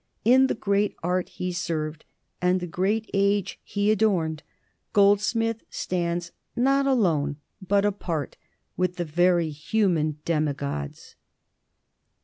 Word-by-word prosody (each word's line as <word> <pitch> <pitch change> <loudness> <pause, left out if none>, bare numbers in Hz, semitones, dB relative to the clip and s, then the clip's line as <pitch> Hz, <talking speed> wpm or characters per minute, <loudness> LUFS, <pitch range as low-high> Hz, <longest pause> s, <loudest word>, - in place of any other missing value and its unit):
In 260 +3 +6
the - - -1
great 200 -1 0
art 180 +1 0
he 180 0 -4
served 160 -3 -3 0.4
and 180 +1 +3
the 180 - -4
great 195 +6 -1
age 200 0 +1
he 205 +1 0
adorned 180 -8 +1 0.5
Goldsmith 210 +3 +3
stands, 170 -1 -2 0.2
not 275 +3 +3
alone, 165 - +2 0.3
but 200 +2 +2
apart, 170 -8 -2 0.4
with 180 -1 0
the 175 - -2
very 170 0 +2
human 155 -1 0
demigods. 140 - -2
180 Hz, 115 wpm, -25 LUFS, 165-205 Hz, 0.5 s, In